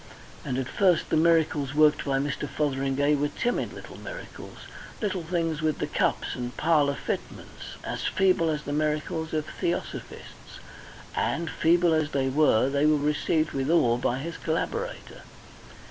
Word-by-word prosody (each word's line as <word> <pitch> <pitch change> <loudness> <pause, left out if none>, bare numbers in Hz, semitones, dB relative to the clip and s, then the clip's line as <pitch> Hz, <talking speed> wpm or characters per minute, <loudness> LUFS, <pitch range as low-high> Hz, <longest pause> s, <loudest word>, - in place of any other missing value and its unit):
And 125 - -3
at 130 -2 -2
first 180 -1 +2
the - - +3
miracles 155 -4 +2
worked 155 0 +4
by 135 -1 +1
Mr. 140 +1 -2
Fotheringay 140 0 0
were 145 0 +1
timid 240 +10 -2
little - - -10
miracles - - -9 0.4
little 195 -4 -1
things 165 -2 -1
with 155 -1 0
the - - -1
cups - - 0
and 125 -1 -5
parlour 150 -3 +3
fitments, - - -6
as - - -4
feeble 185 -3 +2
as 150 -1 -2
the 145 - -4
miracles 155 +1 -1
of 155 -1 -1
Theosophists, 170 +3 -5 0.6
and, 165 0 -1
feeble 170 0 +3
as 155 -1 0
they 135 -1 +1
were, 135 -4 +3
they 140 +2 +2
were 155 0 +4
received 150 +2 0
with 135 +1 -2
awe 120 -8 +4
by 125 0 0
his 165 +5 -5
collaborator. 460 - -3
155 Hz, 155 wpm, -27 LUFS, 140-165 Hz, 0.6 s, worked